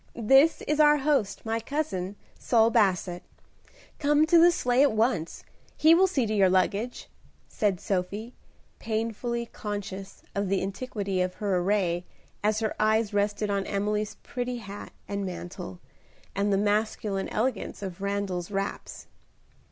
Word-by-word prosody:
This 270 +7 +4
is 300 +1 -1
our 295 0 +6
host, 270 -9 0
my 225 +1 0
cousin, 225 -8 -3 0.2
Saul 230 -1 +3
Basset. 185 -5 +1 0.8
Come 295 +1 +4
to 335 +1 +5
the 345 +1 +7
sleigh 250 -6 +2
at 285 -5 +4
once, 215 -7 0 0.3
he 315 +2 +6
will 375 +3 +5
see 275 -10 0
to 215 - -2
your 195 -3 +4
luggage," 200 +6 0 0.4
said 200 -4 0
Sophie, 205 +5 -3 0.5
painfully 230 +2 -2
conscious 200 -3 -6
of 200 -1 -1
the 195 -1 +1
antiquity 195 -2 -3
of 180 0 -1
her 205 -3 -1
array 180 -2 0 0.4
as 215 +1 +1
her 220 - 0
eyes 215 0 +2
rested 205 0 0
on 200 -1 -1
Emily's 210 +1 -1
pretty 245 0 -3
hat 205 -3 -8 0.2
and 200 0 -3
mantle, 175 - -7 0.5
and 200 +1 0
the 195 - +3
masculine 205 -1 0
elegance 240 -2 -2
of 190 -1 -6
Randal's 200 -3 -2
wraps. 195 0 -4
210 Hz, 145 wpm, -27 LUFS, 195-240 Hz, 0.8 s, the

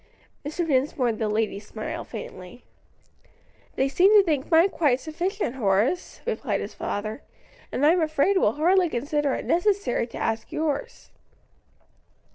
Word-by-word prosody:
Mr. 310 +4 -2
Dinsmore 265 -3 +1
and 220 - -3
the 220 -2 0
ladies 210 -1 -2
smiled 215 - -6
faintly. 190 -1 -9 1.1
"They 265 - +1
seemed 380 +9 +5
to - - +5
think 300 -7 -1
mine 335 +3 +5
quite 285 -9 +1
sufficient, 335 - -3
Horace," 215 - 0
replied 475 - -1
his - - -6
father, 215 +5 -4 0.5
"and 285 - +1
I'm 335 +3 +4
afraid 315 +5 +2
will 220 - +3
hardly 355 +3 +3
consider 285 +2 -1
it - - -5
necessary 350 - +1
to 230 - -9
ask 225 0 -2
yours." 300 -2 -3
285 Hz, 140 wpm, -25 LUFS, 230-345 Hz, 1.1 s, seemed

